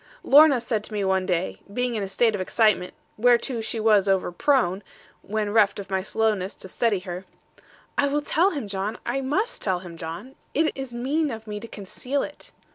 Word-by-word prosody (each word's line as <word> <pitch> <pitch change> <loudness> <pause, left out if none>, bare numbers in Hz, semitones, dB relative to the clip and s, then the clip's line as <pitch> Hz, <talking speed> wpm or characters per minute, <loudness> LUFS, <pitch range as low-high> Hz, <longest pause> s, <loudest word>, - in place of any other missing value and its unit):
Lorna 290 -2 +7
said 225 -3 -2
to - - -8
me 205 -1 -1
one 190 -1 +1
day, 180 0 -1
being 245 +3 -1
in 215 - -2
a 195 - -2
state 220 +4 +2
of 205 - -2
excitement 200 -2 +2 0.2
whereto 240 +1 +3
she 225 +1 -3
was 210 -3 +4
over 190 -2 +1
prone, 195 -2 +2 0.4
when 210 0 -2
reft 215 -3 +4
of 195 -1 -8
my 190 0 +1
slowness 210 -1 0
to - - -10
steady 205 0 0
her, 180 0 -6 0.7
'I 285 - +4
will 290 +1 0
tell 330 +5 +3
him, 285 - -4
John; 200 +2 -3
I 260 +3 -1
must 365 - -1
tell 190 -3 +1
him, 170 -2 -10
John. 165 +12 -7 0.2
It 315 +2 +3
is 270 -2 -6
mean 280 +6 0
of 225 -3 -6
me 210 -1 -5
to 230 - -9
conceal 250 +7 -3
it.' 295 - -9
220 Hz, 200 wpm, -25 LUFS, 195-260 Hz, 0.7 s, Lorna